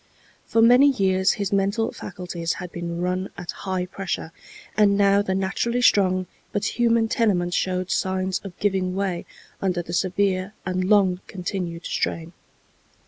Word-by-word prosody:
For 225 - +3
many 250 +5 +7
years 190 -6 +2
his 200 -1 -3
mental 200 +3 +1
faculties 175 -2 -4
had 180 -2 -7
been 170 0 -4
run 185 +1 -1
at 175 - -5
high 185 -2 -3
pressure, 185 -3 -4 0.4
and 200 -2 +4
now 200 0 +4
the 190 -2 -1
naturally 235 +6 0
strong 185 -4 +4 0.3
but 205 +3 -2
human 230 -1 +3
tenement 185 -7 +1
showed 185 0 -1
signs 190 0 0
of 190 -3 -10
giving 190 -3 0
way 190 -3 -2 0.3
under 180 -2 0
the 170 - -7
severe 190 +2 0
and 185 0 -1
long 190 -3 +4
continued 180 -2 -4
strain. 165 +1 -2
190 Hz, 145 wpm, -24 LUFS, 180-200 Hz, 0.4 s, many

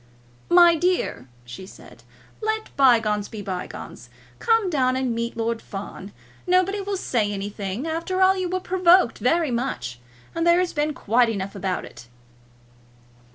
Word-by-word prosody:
"My 345 -1 +7
dear," 335 - -1 0.2
she 125 +10 -9
said, - - -15 0.4
"let 435 0 -3
bygones 225 -6 +3
be 215 -2 -7
bygones. 185 -2 -7 0.3
Come 455 -3 +2
down 260 -7 +1
and 260 -2 -1
meet 235 0 -4
Lord 230 0 -2
Fawn. 195 -1 -8 0.4
Nobody 370 +3 +2
will 395 0 -3
say 220 - -1
anything. 200 +4 -4
After 330 +3 -2
all, 380 0 +5
you 370 -2 -2
were 370 +1 -1
provoked 365 -7 +3
very 320 +2 +1
much, 180 - -3 0.3
and 330 +1 -1
there 340 0 +6
has 360 -1 0
been 300 0 -1
quite 235 +2 +2
enough 195 -3 -4
about 190 -2 -3
it." 120 - -13
260 Hz, 150 wpm, -23 LUFS, -, 0.4 s, My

